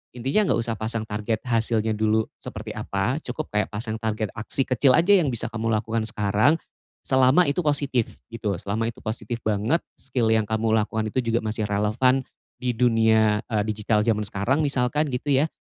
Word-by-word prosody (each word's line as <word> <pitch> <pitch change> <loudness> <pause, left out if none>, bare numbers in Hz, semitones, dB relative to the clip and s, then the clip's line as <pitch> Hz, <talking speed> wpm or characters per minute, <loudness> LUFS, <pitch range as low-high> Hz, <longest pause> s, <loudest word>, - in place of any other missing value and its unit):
Intinya 135 - +1
enggak - - +2
usah 115 -1 -2
pasang 110 0 -2
target 105 +1 -2
hasilnya 115 -2 +1
dulu 110 +1 +1
seperti - - -7
apa, 105 +9 -1
cukup 155 - -4
kayak 105 -1 +1
pasang 110 +1 -3
target 110 -1 -2
aksi 125 +5 +2
kecil 130 +1 +3
aja 170 +4 +3
yang 160 - +1
bisa 120 - +1
kamu 115 0 -3
lakukan 110 +1 -1
sekarang, 105 +6 +2 0.5
selama 130 +6 +4
itu 140 - -1
positif, 140 -5 0
gitu, 110 -3 -3
selama 110 +3 -2
itu - - -18
positif 110 +1 -4
banget, 110 +10 +1 0.2
skill 120 -4 -1
yang 110 0 +3
kamu 110 +1 -1
lakukan 110 0 0
itu 110 - -7
juga 115 0 +1
masih 110 0 -2
relevan 110 +6 +2 0.4
di 125 -1 0
dunia, 110 -3 +3
eee, 110 -3 +1
digital 105 0 0
jaman 110 -2 +1
sekarang 105 +9 0
misalkan 145 +1 +1
gitu 135 +3 -2
ya, 155 - +1
110 Hz, 175 wpm, -24 LUFS, 110-125 Hz, 0.5 s, selama